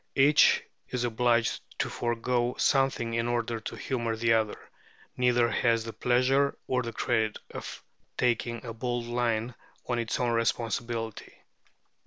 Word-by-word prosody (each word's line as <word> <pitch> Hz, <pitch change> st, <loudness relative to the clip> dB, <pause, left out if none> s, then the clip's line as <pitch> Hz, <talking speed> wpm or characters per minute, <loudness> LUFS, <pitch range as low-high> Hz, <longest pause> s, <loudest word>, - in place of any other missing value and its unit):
Each 145 Hz, +2 st, +5 dB, 0.3 s
is 125 Hz, -1 st, -2 dB
obliged 120 Hz, 0 st, +1 dB, 0.2 s
to -, -, 0 dB
forego 120 Hz, +1 st, -1 dB
something 135 Hz, -4 st, +2 dB
in 115 Hz, 0 st, 0 dB
order 120 Hz, -1 st, -1 dB
to 110 Hz, -, -6 dB
humour 115 Hz, -3 st, -2 dB
the 115 Hz, +1 st, +2 dB
other; 110 Hz, -2 st, +1 dB, 0.6 s
neither 120 Hz, -1 st, +3 dB
has 115 Hz, 0 st, +2 dB
the 115 Hz, 0 st, -7 dB
pleasure 130 Hz, +3 st, +2 dB
or 125 Hz, 0 st, 0 dB
the 115 Hz, -1 st, -4 dB
credit 110 Hz, -2 st, 0 dB
of -, -, -7 dB, 0.3 s
taking 120 Hz, -1 st, 0 dB
a 115 Hz, -, -5 dB
bold 120 Hz, +1 st, -2 dB
line 120 Hz, -1 st, -1 dB, 0.3 s
on 120 Hz, -1 st, 0 dB
its 115 Hz, -2 st, -2 dB
own 120 Hz, -1 st, +1 dB
responsibility. 115 Hz, -1 st, -2 dB
120 Hz, 140 wpm, -28 LUFS, 115-125 Hz, 0.6 s, Each